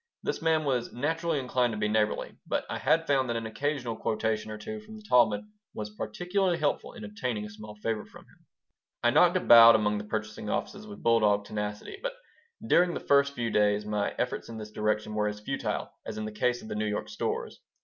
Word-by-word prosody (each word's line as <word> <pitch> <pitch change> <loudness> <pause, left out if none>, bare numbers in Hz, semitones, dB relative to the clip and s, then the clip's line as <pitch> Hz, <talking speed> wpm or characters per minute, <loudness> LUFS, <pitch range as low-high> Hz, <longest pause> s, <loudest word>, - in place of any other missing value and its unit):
This - - -2
man 160 -1 +2
was 125 -4 -1
naturally 160 +5 -1
inclined 125 -3 0
to - - -4
be 105 0 0
neighborly, 105 0 0
but - - -1
I - - -4
had 165 0 +2
found 135 -4 +2
that 115 - -1
an 115 0 -3
occasional 125 +1 -2
quotation 110 0 -1
or 110 - -5
two 215 - -6
from 215 +1 -12
the 215 - -12
Talmud 120 - +4 0.3
was 105 0 -5
particularly 180 - -1
helpful 150 -3 -1
in - - -10
obtaining 125 - -3
a 105 - -9
small 105 0 -10
favor 105 0 -2
from - - -15
him - - -26 0.6
I - - +5
knocked - - +5
about 115 0 +9
among 105 -1 +1
the - - -5
purchasing 110 0 -4
offices 205 - -3
with 205 -1 -10
bulldog 105 -3 +3
tenacity, 105 - -5
but - - -3 0.5
during 175 -4 +4
the - - -2
first 140 0 +3
few 115 -3 -2
days 105 0 +2
my 105 -1 -1
efforts - - -2
in 115 - -7
this 105 -1 -8
direction 105 0 -1
were 105 0 +1
as 105 0 -4
futile - - -3
as 110 - -6
in 110 - -3
the 110 - -5
case 120 +3 0
of - - -9
the - - -4
New 110 0 -1
York 105 0 -2
stores. 105 - -4
115 Hz, 215 wpm, -29 LUFS, 105-145 Hz, 0.6 s, about